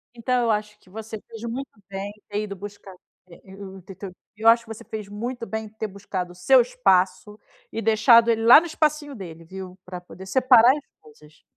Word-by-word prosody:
Então 245 +1 0
eu 230 - +2
acho 210 0 -3
que - - -24
você 220 +2 -8
fez 225 0 -11
muito 250 +4 -5 0.2
bem 195 +1 -5
em 210 +1 -16
ter 205 +1 -3
ido 200 -2 -6
buscar, 200 0 -10 0.4
eh 170 - -15
eh 190 0 -13
o 195 -1 -10
te 190 +2 -12
teu 195 -1 -8 0.2
eu 220 +2 -1
acho 230 +1 +6
que 230 - -19
você 220 - -13
fez 215 -2 -7
muito 235 +4 -5
bem 220 -1 -5
de 215 +1 -21
ter 220 - -3
buscado 190 -2 -6
o - - -15
seu 250 +9 +5
espaço 195 -4 +1 0.4
e 225 - -3
deixado 230 +2 +5
ele 225 -1 -1
lá 240 +5 +10
no - - -7
espacinho 300 -3 -1
dele, 170 -8 -10
viu. 185 +1 -10
Pra 180 -1 -7
poder 180 +1 -13
separar 245 +3 +5
as 295 - -10 0.2
coisas. 150 0 -20
210 Hz, 225 wpm, -23 LUFS, 190-230 Hz, 0.4 s, lá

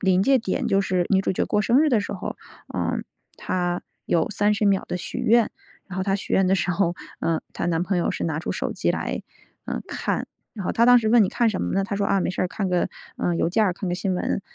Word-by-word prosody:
临 190 -1 +3
界 270 +5 +4
点 205 -5 -2
就 195 - +3
是 185 -2 +1
女 190 -2 +4
主 195 - 0
角 - - 0
过 210 - +1
生 230 +5 +3
日 310 - +4
的 230 -4 +3
时 205 - -4
候， - - -5 0.4
呃， - - -1 0.4
她 175 -1 -1 0.2
有 165 -2 +1
30 210 +1 +1
秒 200 -2 +3
的 - - -2
许 180 - -5
愿。 235 -1 +3 0.4
然 190 - -7
后 190 - 0
她 195 0 +1
许 200 - -4
愿 190 - +4
的 190 - +3
时 190 0 0
候， 175 -1 +1 0.3
呃， 165 -1 0
她 - - -3
男 170 -1 +1
朋 185 0 0
友 175 - 0
是 - - -3
拿 160 -2 -1
出 165 - -4
手 - - -2
机 - - 0
来， - - -2 0.4
呃， - - -3
看。 - - -2 0.3
然 200 -4 -6
后 - - 0
她 230 - +3
当 245 0 +8
时 220 -2 0
问： 235 +1 +6
“你 195 - +2
看 235 +3 +2
什 195 - -3
么 - - -2
呢？” 195 - +2
他 200 +1 -3
说： 200 - 0
“啊， 195 - +2
没 - - 0
事 - - -4
儿， - - +2
看 195 +1 -2
个， 180 -1 +1 0.3
呃， 175 - 0
邮 165 - +1
件 215 +4 +3
儿、 190 - +2
看 180 +2 -5
个 175 - 0
新 185 +1 -1
闻。” 180 - -1
195 Hz, 285 characters per minute, -24 LUFS, 180-210 Hz, 0.4 s, 当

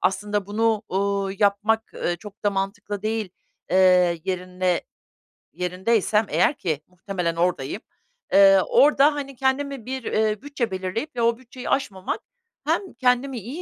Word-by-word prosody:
aslında 200 +2 0
bunu, 220 +1 +1
uuu, 200 +1 0
yapmak, 210 +2 +2
eee, 175 - -1
çok 210 +3 -13
da 205 - +4
mantıklı 200 +1 -3
değil, 220 -1 -1 0.4
eee, 180 -2 +4
yerine, 180 -1 -1 0.7
yerindeysem 190 +5 +1
eğer - - +3
ki 165 - -3
muhtemelen 180 -2 -3
oradayım, 170 0 -1 0.5
eee, 195 -1 +7
orada 290 +1 +5
hani 275 -2 -5
kendime 270 -1 -1
bir, 260 0 -4
iii, 215 -1 0
bütçe 270 -7 -3
belirleyip 190 +10 -4
ve 240 - -1
o 230 0 +2
bütçeyi 255 0 -9
aşmamak 190 -8 -1 0.5
hem 385 - -1
kendimi 250 +1 +1
iyi 255 - -7
205 Hz, 135 wpm, -24 LUFS, 185-240 Hz, 0.7 s, eee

